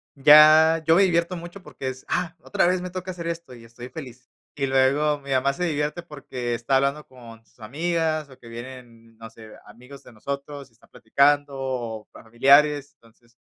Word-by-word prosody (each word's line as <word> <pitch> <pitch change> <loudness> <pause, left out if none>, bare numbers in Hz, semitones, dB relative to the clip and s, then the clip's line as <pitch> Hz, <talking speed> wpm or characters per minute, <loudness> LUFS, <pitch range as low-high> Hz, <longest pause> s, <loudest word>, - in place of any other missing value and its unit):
ya, 155 +3 +6
yo 165 - +4
me 195 - +5
divierto 170 -1 0
mucho 175 +3 -10
porque 135 -6 -7
es: 130 0 -10
"Ah, 180 -1 -2
otra - - 0
vez 180 0 0
me 180 - -6
toca 185 0 -6
hacer 170 -2 -7
esto, 170 -5 -6
y 115 -1 -15
estoy 120 +2 -12
feliz". 130 -5 -11 0.3
Y 140 -2 -2
luego 135 +3 +2
mi 140 -1 -10
mamá 135 +1 +1
se 180 - -5
divierte, 150 +1 -3
porque 135 -6 -6
está 120 +3 -1
hablando 140 +3 -1
con 115 -3 -15
sus 115 - -33
amigas, 155 +5 -2
o 130 - -16
que 115 - -17
vienen, 115 -1 -12
no 115 0 -11
sé, 110 -1 -14 0.2
amigos 125 +6 -15
de - - -16
nosotros 140 +4 -7
y - - -34
están 115 - -26
platicando, 140 +4 +1
o 120 -5 -5
familiares. 140 +5 +2
Entonces, 115 +1 -27
140 Hz, 190 wpm, -23 LUFS, 120-155 Hz, 0.3 s, ya